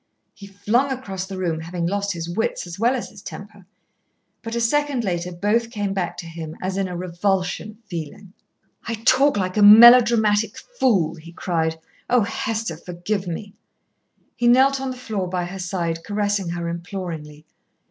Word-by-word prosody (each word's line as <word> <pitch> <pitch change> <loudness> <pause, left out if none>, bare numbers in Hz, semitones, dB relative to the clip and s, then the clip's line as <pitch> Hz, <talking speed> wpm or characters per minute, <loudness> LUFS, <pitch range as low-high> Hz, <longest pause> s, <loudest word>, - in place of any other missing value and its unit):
He 200 - -12
flung 225 +7 0
across 195 -8 -5
the 190 -1 -6
room, 170 -4 -1
having 170 +1 -4
lost 200 +2 -1
his 165 -1 -5
wits 180 +4 -2
as 175 +1 -9
well 240 +4 +3
as 250 - -5
his 210 -3 -13
temper. 200 -2 -10 0.7
But 230 0 -5
a - - 0
second 275 +2 +1
later 180 -2 -2
both 210 +6 0
came 205 -4 -3
back 185 -3 -3
to - - -7
him 160 -1 -7
as 185 0 -3
in 195 -1 -1
a 180 -1 -5
revulsion 180 +2 -1
of 230 - -35
feeling. 175 +3 -7 0.5
"I 230 - -1
talk 255 +4 +3
like 185 0 -2
a - - +3
melodramatic 220 0 +7
fool," 250 - 0
he 165 +1 -12
cried. 160 -2 -2 0.3
"Oh, 245 -1 +4
Hester, 225 -5 -2
forgive 180 +3 -4
me!" 200 +4 -6 0.8
He 240 - +1
knelt 265 +2 +5
on 270 - -2
the 255 - -6
floor 210 -7 -3
by 180 -1 -2
her 190 +2 -7
side, 170 -3 -3
caressing 205 -3 -1
her 170 0 -3
imploringly. 170 -4 -6
195 Hz, 175 wpm, -22 LUFS, 175-225 Hz, 0.8 s, melodramatic